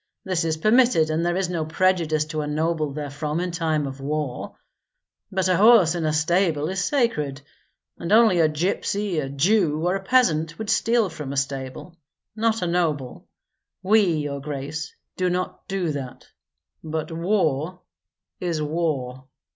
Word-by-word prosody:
This 185 -3 -1
is 160 -1 0
permitted, 215 -5 +4
and 160 +2 0
there 175 +1 0
is 190 -1 0
no 170 -2 -2
prejudice 160 -2 +1
to 155 0 -3
a 150 - -4
noble 155 0 -1
therefrom 150 +2 -4
in 180 0 -2
time 160 -3 0
of 135 0 -6
war. 145 -2 -4 0.8
But 190 -1 0
a 185 - +3
horse 210 -5 +6
in 170 -2 -2
a 155 - +1
stable 160 0 +1
is 190 0 -1
sacred; 150 - 0 0.6
and 170 - -4
only 220 -5 +5
a 160 -2 +4
gypsy, 180 +2 -1
a 135 - -5
Jew, 155 +1 +2
or 180 +2 +2
a 195 - -4
peasant 165 -9 +2
would 220 -1 -2
steal 230 0 +2
from 150 -4 -7
a 140 - -4
stable, 135 +5 -4 0.4
not 225 -2 0
a - - +1
noble. 155 -7 -1 0.6
We, 195 -3 +4
your 145 -2 -3
grace, 145 +2 -5 0.3
do 185 -1 +1
not 180 +1 -3
do 190 -4 -1
that. 135 -4 -7 0.6
But 160 0 -4
war 170 -1 0 0.6
is 170 -3 -2
war!" 145 -5 -2
165 Hz, 160 wpm, -23 LUFS, 150-185 Hz, 0.8 s, horse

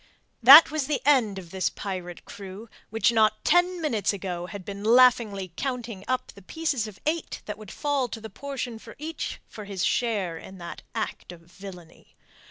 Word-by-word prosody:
That 280 +8 +10
was 305 -4 -1
the 295 -2 0
end 245 -9 +3
of 175 -3 -9
this 190 -1 0
pirate 180 -3 -6
crew, 200 +2 -9 0.2
which 225 +1 +2
not 215 -2 +2
ten 355 +2 +3
minutes 230 - 0
ago 180 -3 -4
had 200 -1 -8
been 200 0 -7
laughingly 220 -6 +4
counting 240 -7 -4
up 255 0 -2
the 200 - -15
pieces 275 - -2
of 210 -2 -12
eight 315 +1 -2
that 210 0 -6
would 215 -3 -11
fall 285 0 -1
to 225 - -7
the 220 - -8
portion 265 +2 -5
of - - -12
each 315 +3 -5
for 210 - -10
his 195 -2 -2
share 200 -9 0
in 190 - -11
that 170 -1 -8
act - - -4
of 175 -1 -12
villainy. 175 -1 -13
215 Hz, 180 wpm, -26 LUFS, 190-260 Hz, 0.2 s, That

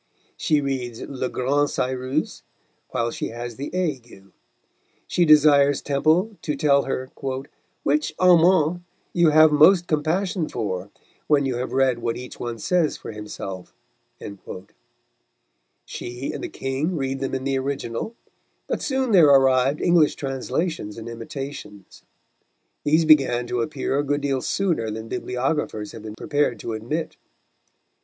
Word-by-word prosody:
She 150 -2 +1
reads 125 -4 -3
Le 130 -2 -4
Grand 140 +3 +1
Cyrus 130 +3 -2 0.5
while 115 0 -1
she - - -4
has 120 0 -7
the 140 +2 -4
ague; 125 - -4 0.7
she 175 - +1
desires 145 -2 +5
Temple 160 +9 +1
to 150 - -2
tell 140 -1 +3
her 130 -1 -3 0.7
"which 150 +2 0
amant 175 -1 +4 0.3
you 170 -2 +4
have 155 0 +6
most 175 +4 +6
compassion 170 +3 -1
for, 100 -4 -4 0.4
when 145 -2 +3
you 130 -3 -1
have 125 +1 -3
read 130 -2 +2
what 115 0 -2
each 125 0 -9
one 120 -1 -4
says 170 - +1
for - - -8
himself." 100 -3 -8 2.1
She 120 +3 -6
and - - -6
the 360 - -4
King 150 - -2
read 135 -1 -2
them 135 0 -2
in 130 - -3
the 135 0 0
original, 135 - -4 0.5
but - - -3
soon 265 -3 0
there 175 -7 +7
arrived 135 0 +4
English 170 -4 +4
translations 135 - -3
and 115 0 -8
imitations. 115 -3 -8 0.8
These 155 +2 +3
began 135 -6 +4
to 120 0 -2
appear 140 +1 -2
a - - +1
good 145 0 -1
deal 135 -2 -1
sooner 170 - 0
than 110 +1 -6
bibliographers 125 -4 -2
have 115 - -10
been 110 0 -8
prepared 145 -4 0
to 115 - -4
admit. 125 +10 -4
140 Hz, 140 wpm, -23 LUFS, 120-155 Hz, 2.1 s, there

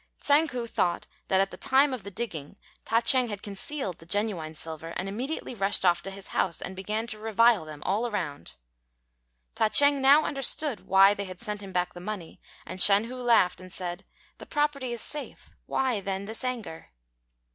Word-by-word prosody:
Tsang 295 +3 +4
ku 245 -4 -4
thought 180 -6 -1 0.2
that 190 - +2
at 195 - -1
the - - -9
time 270 +1 +3
of 250 - -4
the 200 - -8
digging 195 -6 -6 0.3
Ta 230 +1 +2
ch'êng 250 0 +4
had 205 -2 -6
concealed 200 - -5
the 165 - -14
genuine 185 -6 -1
silver, 160 +1 -7
and 185 - -3
immediately 250 +9 -4
rushed 195 -3 +1
off 175 -1 +3
to - - -7
his 195 0 -8
house, 175 - 0
and 190 - -6
began 210 +4 -3
to 215 -2 -4
revile 225 -3 +3
them 155 -1 -10
all 220 +5 0
round. 145 - -5 1.0
Ta 215 - +1
ch'êng 285 +3 +6
now 280 +3 +6
understood 275 -1 0
why 195 +1 +6
they 200 -1 -5
had 185 -1 -10
sent 210 -3 -5
him 195 -1 -9
back 180 -1 -1
the 175 - -10
money; 190 -3 -7 0.2
and 185 - -1
Shan 200 +2 +9
hu 250 +2 -7
laughed 225 -8 +3
and 185 0 -12
said, 175 0 -5 0.4
"The - - -11
property 295 -4 -1
is 235 -2 -4
safe; 295 -1 -5 0.2
why, 255 -5 0
then, 195 0 -4
this 220 +4 -6
anger?" 235 -10 -5
205 Hz, 195 wpm, -27 LUFS, 185-245 Hz, 1.0 s, Shan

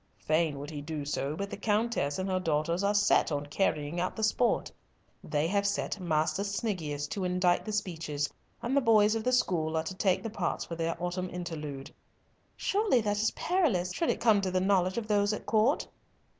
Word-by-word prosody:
"Fain 155 -2 +1
would 145 +2 -7
he 145 -2 -5
do 150 -1 -5
so, 145 0 -2
but 200 +4 -4
the - - -3
Countess 210 -8 0
and 190 0 -2
her 185 -1 0
daughters 165 +1 0
are 205 +1 +2
set 205 -4 +3
on 145 -1 -1
carrying 150 0 -1
out 180 +1 -1
the 220 - -3
sport. 235 +2 +1 0.5
They 150 0 0
have 200 +3 +1
set 200 0 -2
Master 160 +1 0
Sniggius 180 -9 -2
to 195 - -3
indite 180 -1 +2
the 215 - -3
speeches, 160 -8 -2 0.4
and 240 +4 0
the 280 - +4
boys 215 -3 +5
of 225 -1 -2
the 255 - +1
school 165 -10 +1
are 160 - 0
to 185 - -5
take 185 0 +1
the 225 - -4
parts 190 -6 -2
for - - -7
their 165 0 -2
autumn 180 +1 -2
interlude." 155 -6 -6 0.6
"Surely 405 - +2
that 205 -1 0
is 220 - +3
perilous, 225 - +1
should 335 - 0
it - - 0
come 215 -4 +4
to 190 - -1
the 185 0 +1
knowledge 185 0 +2
of 225 -2 -2
those 205 -1 +2
at - - -5
Court." 225 +7 +2
185 Hz, 205 wpm, -30 LUFS, 160-210 Hz, 0.6 s, boys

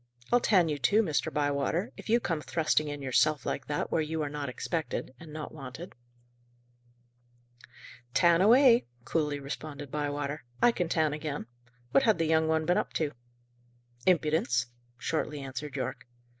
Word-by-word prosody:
I'll 245 - +6
tan 190 -8 +4
you 150 -2 -2
too, 205 - +4
Mr. 155 -7 -1
Bywater, 145 - 0
if - - -11
you 235 +2 +5
come 165 -9 -2
thrusting 155 -1 +1
in 145 -1 -5
yourself, 145 +3 +2
like 135 - -3
that, 145 - -2
where 160 - +2
you 155 0 -2
are 145 - -4
not 145 -2 -4
expected, 130 -1 -3
and 160 -2 -11
not 155 0 -6
wanted." 145 +4 -8 2.2
"Tan 170 -1 +5
away," 240 - +6 0.2
coolly 150 -3 0
responded 145 0 -7
Bywater. 145 -1 -3 0.2
"I 240 - +6
can 175 -7 -2
tan 155 -3 +2
again. 150 -5 -4 0.5
What - - +5
had 220 -7 +3
the 165 - +1
young 160 0 +3
one 160 0 +1
been 175 +2 +3
up - - -4
to?" 155 -3 0 1.0
"Impudence," 150 -8 +2 0.3
shortly 150 +1 -2
answered 135 +1 -6
Yorke. 130 - -4
155 Hz, 155 wpm, -29 LUFS, 145-165 Hz, 2.2 s, I'll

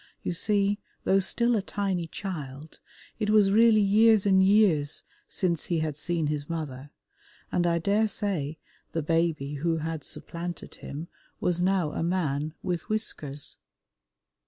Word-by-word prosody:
You - - -1
see, 205 +3 +2 0.2
though 195 - +4
still 235 +5 +1
a 210 - +1
tiny 190 -4 -2
child, 155 -6 -7 0.4
it 210 -2 0
was 210 -2 +5
really 220 0 +6
years 215 +1 +5
and 190 -1 +5
years 190 -8 +3 0.2
since 170 -5 -1
he 170 - 0
had 155 -2 -1
seen 165 +1 -1
his 145 0 -2
mother, 145 -4 -5 0.6
and 175 0 +1
I 170 0 +2
daresay 200 -5 0 0.4
the 165 - -1
baby 155 -3 0
who 165 0 +1
had 160 -1 -4
supplanted 170 +1 -7
him 155 +4 -6 0.3
was 175 -1 0
now 185 -4 +2
a - - -3
man 155 -3 -1
with 180 +1 -3
whiskers. 150 -10 -2
175 Hz, 140 wpm, -27 LUFS, 155-200 Hz, 0.6 s, really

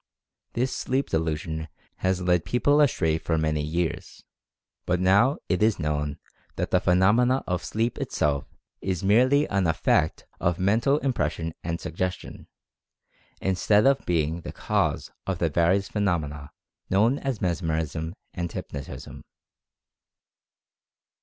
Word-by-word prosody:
This 125 +2 -1
sleep 130 +2 -1
de 80 - +3
lusion 80 0 -3 0.3
has 95 -1 0
led 90 -2 +2
people 145 +4 +3
astray 80 - +2
for 80 0 -1
many 80 -1 0
years, 80 +3 -3 0.6
but 90 0 +1
now 100 +9 +4
it 90 +2 0
is 110 0 +3
known 75 -1 -2 0.4
that - - -3
the - - +4
phenomena 110 +9 +3
of 90 -1 -2
sleep 115 +2 -1
itself 70 -2 -1 0.3
is 95 -2 -2
merely 130 +9 +4
an 95 -3 +1
effect 80 -1 +1
of 85 0 +1
Mental 110 +9 +2
Impression 85 -10 -1
and 85 0 -2
Sugges 90 +3 -2
tion, - - -11 0.9
instead 100 +3 +3
of 135 0 +3
being 80 -1 0
the - - -7
cause - - -1 0.2
of 95 -2 -1
the 85 -1 +1
various 90 +5 +2
phe 105 - -4
nomena 75 -7 -1 0.4
known 110 +8 +3
as 135 -6 -2
Mesmerism 80 -2 -2 0.2
and 85 -2 -3
Hypnotism. 70 -1 -7
90 Hz, 135 wpm, -26 LUFS, 80-105 Hz, 0.9 s, now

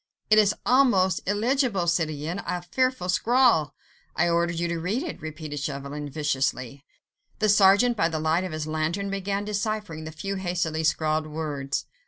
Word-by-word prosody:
"It 215 - +7
is 210 0 +3
almost 220 -9 +3
illegible, 220 -1 +1
citoyen... 165 0 -1
a 180 -1 -3
fearful 255 0 0
scrawl... 200 - +3 0.2
." - - -35
"I 175 +1 +2
ordered 170 0 +1
you 170 +1 0
to 170 -1 -2
read 200 - -1
it," 345 - -6
repeated 155 -1 -6
Chauvelin, 145 +1 -5
viciously. 140 -2 -2 0.5
The 215 0 +1
sergeant, 205 +4 +5
by 165 -4 +2
the 160 - -3
light 160 +3 +1
of 185 - -4
his 155 -1 -4
lantern, 160 +6 -2
began 195 +1 -2
deciphering 210 -6 -3
the 160 - -6
few 195 +5 -4
hastily 175 -4 -2
scrawled 155 0 +1
words. 150 -3 -3
170 Hz, 165 wpm, -25 LUFS, 155-205 Hz, 0.5 s, It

